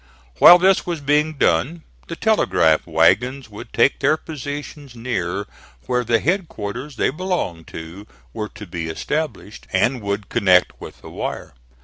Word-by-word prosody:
While 175 Hz, -, +10 dB
this 190 Hz, +1 st, +3 dB
was 170 Hz, -2 st, -4 dB
being 150 Hz, +2 st, +1 dB
done 140 Hz, -, +1 dB, 0.2 s
the 165 Hz, -, -5 dB
telegraph 80 Hz, -, +2 dB
wagons 125 Hz, +4 st, +2 dB
would 105 Hz, -, -10 dB
take -, -, +2 dB
their 155 Hz, -, +2 dB
positions 145 Hz, -3 st, -8 dB
near 100 Hz, -5 st, -3 dB, 0.4 s
where 125 Hz, -1 st, 0 dB
the 115 Hz, -1 st, +2 dB
headquarters 140 Hz, -, -3 dB
they -, -, +1 dB
belonged 155 Hz, -, -3 dB
to 85 Hz, +6 st, -9 dB, 0.3 s
were 105 Hz, -1 st, -4 dB
to 105 Hz, -, -11 dB
be 85 Hz, -2 st, -5 dB
established, 130 Hz, -, -4 dB
and 125 Hz, 0 st, +1 dB
would 100 Hz, 0 st, -3 dB
connect 90 Hz, -2 st, +2 dB
with -, -, -11 dB
the -, -, -11 dB
wire. -, -, -5 dB
125 Hz, 145 wpm, -21 LUFS, 100-155 Hz, 0.4 s, While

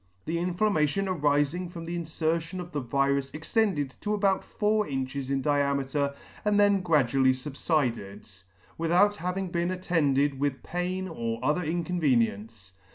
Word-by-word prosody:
The 165 Hz, +1 st, -1 dB
inflammation 180 Hz, -1 st, +1 dB
arifing 150 Hz, 0 st, +1 dB
from 170 Hz, -1 st, -8 dB
the 170 Hz, +1 st, -4 dB
infertion 165 Hz, +1 st, -2 dB
of 175 Hz, -1 st, -7 dB
the 150 Hz, -, -2 dB
virus 140 Hz, +2 st, 0 dB
extended 155 Hz, -, 0 dB
to 210 Hz, 0 st, 0 dB
about 195 Hz, -2 st, +1 dB
four 210 Hz, 0 st, 0 dB
inches 135 Hz, 0 st, -3 dB
in 135 Hz, -1 st, 0 dB
diameter, 140 Hz, -1 st, 0 dB, 0.3 s
and 210 Hz, -1 st, +2 dB
then 200 Hz, -1 st, +4 dB
gradually 135 Hz, -6 st, +3 dB
fubfided, 130 Hz, -, -2 dB, 0.5 s
without 180 Hz, +5 st, +3 dB
having 180 Hz, +1 st, -3 dB
been 170 Hz, 0 st, 0 dB
attended 145 Hz, -7 st, +1 dB
with 140 Hz, -1 st, -1 dB
pain 185 Hz, +2 st, -3 dB
or 115 Hz, -9 st, -3 dB
other 150 Hz, +5 st, +1 dB
inconvenience. 120 Hz, -, -1 dB
155 Hz, 135 wpm, -28 LUFS, 140-180 Hz, 0.5 s, then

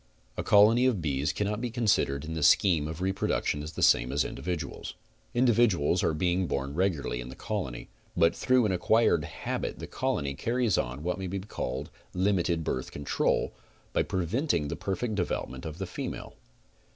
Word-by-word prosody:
A -, -, -2 dB
colony 110 Hz, +5 st, +5 dB
of 120 Hz, -7 st, +1 dB
bees 75 Hz, -2 st, 0 dB
cannot 105 Hz, +6 st, -2 dB
be 125 Hz, -, -2 dB
considered 100 Hz, -, +1 dB
in 80 Hz, -, -5 dB
the 80 Hz, -, -3 dB
scheme 75 Hz, +1 st, +4 dB
of 80 Hz, +2 st, -6 dB
re 95 Hz, +1 st, +1 dB
production 95 Hz, -5 st, -1 dB
the 75 Hz, +2 st, -4 dB
same 60 Hz, +1 st, +4 dB
as 70 Hz, +2 st, +1 dB
individuals. 90 Hz, -3 st, -5 dB, 0.4 s
Individuals 115 Hz, -, +3 dB
are 80 Hz, -, +1 dB
being 90 Hz, +3 st, +1 dB
born 70 Hz, -1 st, -2 dB
regularly 80 Hz, -8 st, 0 dB
in -, -, -7 dB
th 65 Hz, -, -10 dB
ecolony, -, -, -4 dB, 0.3 s
but 85 Hz, -1 st, +4 dB
through 130 Hz, -2 st, +3 dB
an 105 Hz, -, +1 dB
acquired 95 Hz, -2 st, +3 dB
habit -, -, -4 dB
the -, -, -6 dB
colony 70 Hz, -1 st, -1 dB
carries 115 Hz, -, 0 dB
on 60 Hz, +4 st, -2 dB
what 90 Hz, +2 st, -2 dB
may 95 Hz, -, -3 dB
be 95 Hz, +2 st, -3 dB
called 100 Hz, +3 st, -5 dB, 0.2 s
limited 90 Hz, -3 st, +1 dB
birth 65 Hz, -4 st, -2 dB
control, 70 Hz, -, 0 dB, 0.4 s
by -, -, +3 dB
'prevent 95 Hz, -, 0 dB
ing 75 Hz, -3 st, -1 dB
the -, -, -2 dB
perfect 110 Hz, +4 st, -2 dB
development 85 Hz, -7 st, -3 dB
of 80 Hz, -, -7 dB
the -, -, -3 dB
female. -, -, -6 dB
90 Hz, 175 wpm, -29 LUFS, 75-105 Hz, 0.4 s, colony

